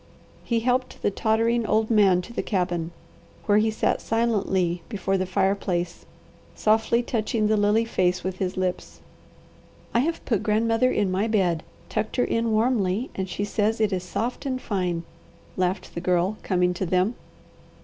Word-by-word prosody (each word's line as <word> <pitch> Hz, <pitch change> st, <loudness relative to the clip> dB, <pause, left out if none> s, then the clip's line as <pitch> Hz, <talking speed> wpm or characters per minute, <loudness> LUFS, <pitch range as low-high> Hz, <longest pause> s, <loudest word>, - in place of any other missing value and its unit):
He 230 Hz, -2 st, 0 dB
helped 255 Hz, +2 st, -1 dB
the -, -, +2 dB
tottering 230 Hz, +3 st, +1 dB
old 220 Hz, +1 st, +1 dB
man 195 Hz, -5 st, +4 dB
to 235 Hz, -, -11 dB
the -, -, -1 dB
cabin, 175 Hz, -4 st, -1 dB, 0.6 s
where 205 Hz, -1 st, +4 dB
he 220 Hz, +1 st, +2 dB
sat 220 Hz, -, 0 dB
silently 190 Hz, -6 st, 0 dB
before 195 Hz, -3 st, -1 dB
the 185 Hz, -1 st, 0 dB
fireplace 185 Hz, -2 st, -1 dB, 0.5 s
softly 225 Hz, +2 st, +2 dB
touching 220 Hz, -2 st, -1 dB
the 215 Hz, +1 st, +3 dB
lily 210 Hz, +2 st, +3 dB
face 180 Hz, -4 st, 0 dB
with 185 Hz, 0 st, -4 dB
his 185 Hz, -1 st, -2 dB
lips. 185 Hz, -1 st, -3 dB, 0.9 s
"I 235 Hz, -, +3 dB
have 325 Hz, +6 st, -1 dB
put 225 Hz, -6 st, +1 dB
grandmother 225 Hz, +3 st, +2 dB
in 200 Hz, -3 st, +1 dB
my 195 Hz, +4 st, +1 dB
bed, 185 Hz, -7 st, +1 dB, 0.3 s
tucked 215 Hz, 0 st, -2 dB
her 245 Hz, -, +2 dB
in 230 Hz, 0 st, 0 dB
warmly, 220 Hz, -1 st, +1 dB
and 190 Hz, -1 st, -4 dB
she 190 Hz, +3 st, -3 dB
says 215 Hz, +2 st, 0 dB
it 215 Hz, -2 st, +2 dB
is 185 Hz, -, -1 dB
soft 230 Hz, +9 st, -3 dB
and 255 Hz, -1 st, -1 dB
fine," 180 Hz, -7 st, -2 dB, 0.5 s
laughed 185 Hz, +1 st, -1 dB
the 170 Hz, -, -4 dB
Girl, 180 Hz, +3 st, +1 dB
coming 180 Hz, -1 st, +1 dB
to 185 Hz, +2 st, -3 dB
them. 185 Hz, +6 st, +2 dB
205 Hz, 165 wpm, -25 LUFS, 185-225 Hz, 0.9 s, man